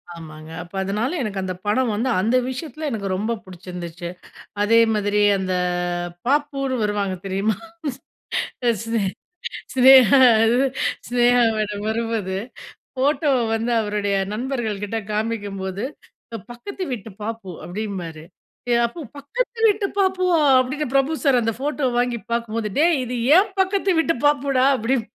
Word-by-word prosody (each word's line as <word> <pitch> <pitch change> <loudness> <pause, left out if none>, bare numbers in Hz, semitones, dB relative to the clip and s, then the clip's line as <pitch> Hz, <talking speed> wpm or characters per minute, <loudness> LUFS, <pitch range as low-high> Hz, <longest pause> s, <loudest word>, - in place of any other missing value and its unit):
ஆமாங்க. 155 -1 -10
அப்ப 175 - -18
அதனால 215 - -1
எனக்கு 205 -5 -3
அந்த 185 0 -3
படம் 230 +3 +1
வந்து, 235 +5 0
அந்த 225 +6 +1
விஷயத்துல 305 +3 -5
எனக்கு 210 -4 -3
ரொம்ப 210 +5 -2
புடிச்சிருந்துச்சு. 175 -2 -8 0.5
அதே 230 +2 +5
மாதிரி, 210 0 +1 0.2
அந்த 190 -1 -2 0.7
பாப்புனு 275 -1 0
வருவாங்க 205 -2 -1
தெரியுமா? 195 +2 0 1.1
சி 240 -1 +3
சினே 225 -2 0 0.7
சினேகா 260 -1 +8 0.3
எது, 240 +4 +3 0.4
சினேகா 245 0 +4
மேடம் 210 -1 -2
வரும் 225 +1 -1
போது, 190 -4 -2 0.6
ஃபோட்டோவ 280 +1 +2 0.2
வந்து 230 +2 -1
அவருடைய 205 -2 -1 0.2
நண்பர்கள்கிட்ட 225 -4 -3 0.2
காமிக்கும்போது, 205 -2 -3 0.7
பக்கத்து 375 +11 -8
வீட்டு 225 -2 -5
பாப்பு 220 -3 -5 0.2
அப்டிம்பாரு. 180 -5 -5 0.5
எ - - +5
அப்போ 235 +9 -9 0.2
பக்கத்து 470 - -3
வீட்டு 410 -1 +1
பாப்புவா! 370 -3 +2 0.2
அப்டின்னு 265 +4 -1
பிரபு 275 +3 +3
சார் 265 -4 +4
அந்த 225 0 0
ஃபோட்டோ 290 0 -1
வாங்கி 245 -1 +1
பாக்கும்போது, 230 -2 -1
டேய் 325 0 +4
இது 250 +1 -5 0.2
ஏன் 390 +1 +2
பக்கத்து 380 0 +2
வீட்டு 330 0 +1
பாப்புடா, 275 -3 +2
அப்படிம் 235 +1 0
230 Hz, 130 wpm, -22 LUFS, 205-275 Hz, 1.1 s, சினேகா